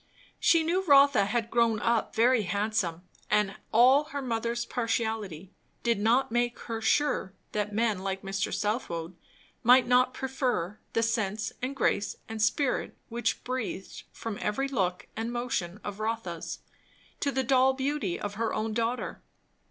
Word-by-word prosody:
She 330 -1 +4
knew 355 +4 +1
Rotha 280 - +6
had 230 +2 -1
grown 230 -2 +3
up 230 +1 0
very 240 +1 +4
handsome; 200 -3 -1 0.3
and 210 -2 +2
all 255 +6 +6
her 285 -2 -5
mother's 235 -1 -1
partiality 220 -7 -2 0.3
did 235 -3 +2
not 230 +4 +2
make 240 0 0
her 225 -1 -4
sure 225 -5 +1 0.2
that 210 0 -1
men 220 -2 +1
like 195 0 -3
Mr. 195 0 -2
Southwode 185 -6 -2 0.5
might 250 +1 +6
not 250 +1 +4
prefer 250 -8 -2
the 230 - +2
sense 220 -2 -1
and 260 +2 -3
grace 205 -6 +1
and 220 -1 -5
spirit 250 +5 +1
which 235 -1 -1
breathed 245 -6 -4
from 225 -3 -6
every 270 +6 0
look 190 -9 -1
and 225 +1 -3
motion 230 -7 -2
of 205 0 -6
Rotha's, 215 -7 -4 0.6
to 280 - 0
the 265 0 0
doll 260 +1 +4
beauty 265 -9 -1
of 205 -1 -4
her 225 +2 -1
own 220 0 -1
daughter. 230 +2 -2
225 Hz, 150 wpm, -28 LUFS, 205-250 Hz, 0.6 s, Rotha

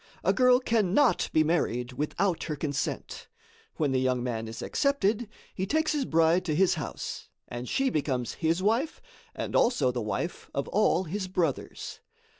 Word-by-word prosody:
A - - +3
girl 250 -1 +5
cannot 230 +2 +2
be 155 - +4
married 130 -6 0
without 165 +5 -1
her 155 - -3
consent. 145 0 -3 0.5
When 150 -4 0
the 130 - +2
young 130 -1 +1
man 115 -3 -3
is 110 - -7
accepted, 240 -6 +1 0.2
he 190 0 -3
takes 315 +7 +1
his 290 -3 0
bride 165 +1 +3
to 155 -4 0
his 190 +2 +4
house, 150 -6 -5 0.2
and 120 +1 -6
she 270 -1 +1
becomes 130 -5 -1
his 165 +3 +1
wife 235 +9 +1 0.4
and - - -4
also 150 - +3
the 125 -1 -3
wife 105 - -3
of 140 - -1
all 190 -3 +3
his 190 +3 -4
brothers. 170 -6 -2
165 Hz, 165 wpm, -28 LUFS, 135-215 Hz, 0.5 s, girl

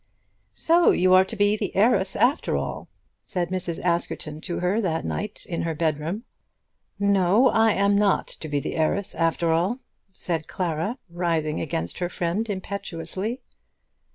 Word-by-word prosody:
"So 340 +1 +4
you 185 +1 +4
are 185 0 +8
to 225 - -4
be 205 0 +3
the - - -4
heiress 195 -2 +3
after 265 +6 +2
all," - - -4 0.4
said 175 -2 -2
Mrs. 180 -3 -2
Askerton 170 -3 -1
to 175 - -4
her 185 +5 +1
that 165 -5 -1
night 210 0 -4
in 170 -3 -3
her 165 -1 -2
bedroom. 160 +6 -1 0.7
"No; 200 +4 +4
I 225 -1 +4
am 200 +1 +2
not 200 -1 +3
to 155 - -7
be 145 -1 0
the - - -4
heiress 185 +5 0
after 165 0 +1
all," 180 +9 +1 0.3
said 165 -4 -3
Clara, 180 - -2
rising 165 -3 -1
against 85 - -3
her 175 -1 -1
friend 180 +6 -2
impetuously. 195 +3 -3
180 Hz, 155 wpm, -25 LUFS, 165-205 Hz, 0.7 s, are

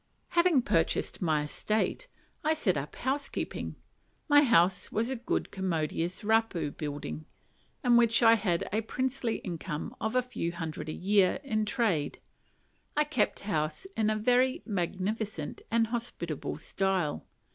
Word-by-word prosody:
Having 340 -7 +4
purchased 165 -8 +1
my 155 -4 +2
"estate," 215 - -1 0.4
I 310 +1 +2
set 200 - +1
up 140 0 -4
housekeeping. 275 +2 -3 0.5
My 290 -1 +7
house 190 - +3
was 230 +4 0
a - - -1
good 240 0 -2
commodious 175 -1 -2
raupo 210 -9 +1
building; 150 +1 -5 0.6
and 240 -1 +6
as 230 0 +3
I 225 0 +8
had 195 -6 +1
a 220 - +2
princely 255 +1 -1
income 170 -3 -5
of 220 +2 -1
a 255 - +4
few 170 -9 -3
hundred 160 -2 -5
a - - -1
year 190 +2 +3
"in 215 -6 0
trade," 210 - 0 0.8
I 300 - +5
kept 290 -7 0
house 160 - -2
in 215 -1 +2
a 215 - +1
very 250 +4 +2
magnificent 195 -2 -2
and 230 0 +3
hospitable 225 - -3
style. 185 -2 -1
210 Hz, 140 wpm, -30 LUFS, 170-240 Hz, 0.8 s, I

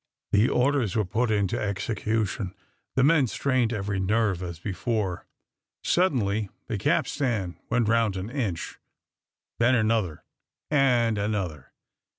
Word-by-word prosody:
The 105 +4 +4
orders 125 -5 +1
were 110 -2 +2
put 115 +6 0
into 100 -3 +1
execution. 105 -1 -2 0.4
The 130 - +4
men 145 -2 +5
strained 130 -1 +1
every 100 -3 -2
nerve 100 -1 +1
as 85 -3 -5
before. 95 +1 -2 0.6
Suddenly 110 - +1 0.2
the 110 - -3
capstan 105 -4 0
went 120 -1 +2
round 110 -3 +2
an 95 +5 -5
inch; 105 - -3 0.8
then 120 +2 +4
another 110 -8 0 0.5
and 120 -6 +3
another. 95 -10 -3
110 Hz, 120 wpm, -26 LUFS, 95-120 Hz, 0.8 s, men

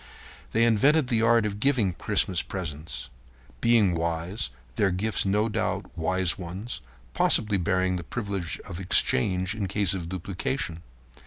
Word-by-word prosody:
They 115 - +3
invented 130 +6 +4
the 115 -3 +2
art 115 -1 +4
of 105 -1 -3
giving 115 -7 +2
Christmas 90 +1 +2
presents. 75 -7 -6 0.5
Being 115 -6 +4
wise, 85 +4 -2 0.3
their 100 - +2
gifts 95 +3 0
were - - +1
no 105 +2 +2
doubt 105 - -3
wise 90 +2 +1
ones, 95 +7 -6 0.3
possibly 105 - +2
bearing 90 +1 +1
the 90 - -6
privilege 100 -5 -4
of 85 - -8
exchange 95 +1 +2
in 105 -3 -3
case 100 -1 0
of 85 -3 -4
duplication. 95 0 -3
95 Hz, 145 wpm, -26 LUFS, 90-110 Hz, 0.5 s, invented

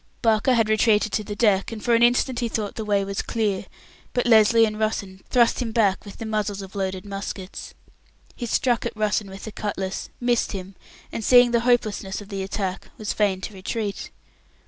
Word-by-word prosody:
Barker 225 +3 +3
had 225 -2 +3
retreated 215 -1 +3
to 215 - -1
the 205 0 -6
deck, 205 -2 +2
and 220 -2 -7
for 240 - +3
an 230 - +4
instant 245 +1 +3
he 235 -2 -1
thought 215 -2 -3
the 220 - -5
way 200 -2 +1
was 200 0 -2
clear, 210 -5 -1 0.5
but 245 - 0
Lesly 225 0 +6
and 215 -1 -3
Russen 200 -3 -2
thrust 240 -1 +3
him 230 -2 -2
back 210 -4 +2
with 200 - -10
the 225 - -6
muzzles 210 -2 -2
of 190 - -10
the 200 - -6
loaded 190 0 -3
muskets. 195 -1 -6 0.6
He 240 - -5
struck 240 +1 +1
at - - -4
Russen 210 -1 0
with 195 0 -10
the 220 - -6
cutlass, 195 -2 -4
missed 240 -2 +1
him, 190 0 -7 0.4
and, 225 - -4
seeing 245 +1 +6
the 235 - +3
hopelessness 215 -5 +1
of 205 -1 -11
the 195 -2 -4
attack, 190 -1 -4
was 215 -3 -3
fain 195 -3 +1
to 210 - -6
retreat. 200 +2 -4
215 Hz, 205 wpm, -24 LUFS, 195-230 Hz, 0.6 s, Lesly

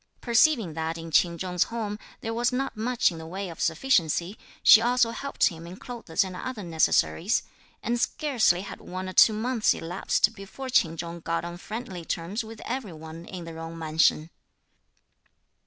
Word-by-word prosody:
Perceiving 235 - +3
that 160 +1 -3
in 165 0 -8
Ch'in 170 +2 +3
Chung's 180 -1 0
home 215 -3 -4 0.2
there 225 - -3
was 240 +2 +1
not 265 +1 -2
much 230 -1 +1
in 165 - -8
the 160 - -8
way 190 +2 -5
of 165 - -8
sufficiency, 175 - +1 0.3
she 220 - +9
also 240 0 +3
helped 280 +4 +1
him 165 0 -10
in 175 - -8
clothes 235 -11 -2
and 185 -1 -7
other 230 +1 -5
necessaries; 160 - +2 0.4
and 235 +1 0
scarcely 245 - +2
had 200 - -9
one 185 +1 -6
or 185 - -6
two 220 - +7
months 225 +1 +1
elapsed 180 +5 0
before 225 +6 -8
Ch'in 165 -9 +3
Chung 170 +1 -5
got 165 +1 -2
on 175 0 -6
friendly 200 -2 -6
terms 175 +7 -3
with 220 0 -10
every 240 -7 -4
one 160 +1 -10
in 180 -2 -8
the 165 - -8
Jung 165 +1 -7
mansion. 160 0 +2
185 Hz, 175 wpm, -27 LUFS, 165-230 Hz, 0.4 s, she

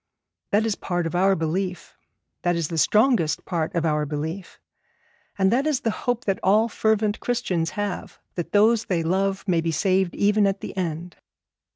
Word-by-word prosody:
That 210 +2 +2
is 225 - +1
part 175 -3 -2
of 165 - -3
our 190 +2 +3
belief; 180 +3 -3 0.5
that 175 -1 +1
is 165 -3 -2
the 165 - -4
strongest 210 - +2
part 165 -2 -2
of 170 -1 0
our 150 -1 +1
belief; 155 +5 -5 0.8
and 190 -1 +3
that 265 +6 +2
is 295 -4 0
the 225 - 0
hope 245 +2 -2
that 195 -1 0
all 215 +4 +4
fervent 220 -1 0
Christians 185 -9 -1
have, 205 -2 -4
that 175 - -5
those 220 +2 +4
they 170 -3 0
love 195 +4 -1
may 170 -3 +2
be 165 0 -1
saved 185 +2 +1
even 205 0 +3
at 195 0 -2
the - - -7
end. 175 -1 -4
190 Hz, 180 wpm, -24 LUFS, 170-210 Hz, 0.8 s, all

